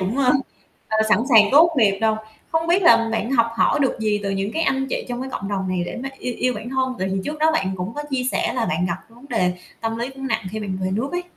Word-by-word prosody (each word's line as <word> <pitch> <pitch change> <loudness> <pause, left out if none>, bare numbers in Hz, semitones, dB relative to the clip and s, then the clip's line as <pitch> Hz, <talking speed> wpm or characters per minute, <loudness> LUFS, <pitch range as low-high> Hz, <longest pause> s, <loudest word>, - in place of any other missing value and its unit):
cũng, 190 +6 -2
ơ, 255 -2 +4 0.6
ờ, 220 - 0
sẵn 210 - +5
sàng 225 -4 +8
tốt 325 +4 +7
nghiệp 200 -6 +3
đâu. 220 -1 +2 0.4
Không 325 0 +1
biết 350 +3 +3
làm 230 -9 +5
bạn 225 +1 -1
học 230 -3 +4
hỏi 290 - +3
được 270 - +1
gì 210 -1 +1
từ 200 - -2
những 195 +2 -2
cái 325 - -1
anh 270 -3 +1
chị - - -2
trong 245 0 -4
cái 265 - -5
cộng 195 -5 -4
đồng 190 -2 -2
này 185 -1 -1
để - - -6
mà 270 - -3
yêu 250 -2 -4
yêu 250 0 0
bản 240 - -6
thân, 260 -1 0
tại 190 - -1
vì 195 - -1
trước 300 +1 -4
đó 315 +1 +4
bạn 195 -12 0
cũng 185 +4 -5
có 295 - -4
chia 265 -2 0
sẻ - - 0
là 255 - 0
bạn 170 +3 0
gặp 170 - -2
vấn 235 +3 -18
đề 185 -7 +1 0.3
tâm 225 0 -2
lý 240 +3 -3
cũng 270 0 -7
nặng 220 -4 -1
khi 220 - -4
bạn 190 -3 -4
về 185 0 -1
nước 225 +8 -1
ấy? 355 0 -1
230 Hz, 290 wpm, -22 LUFS, 200-270 Hz, 0.6 s, sàng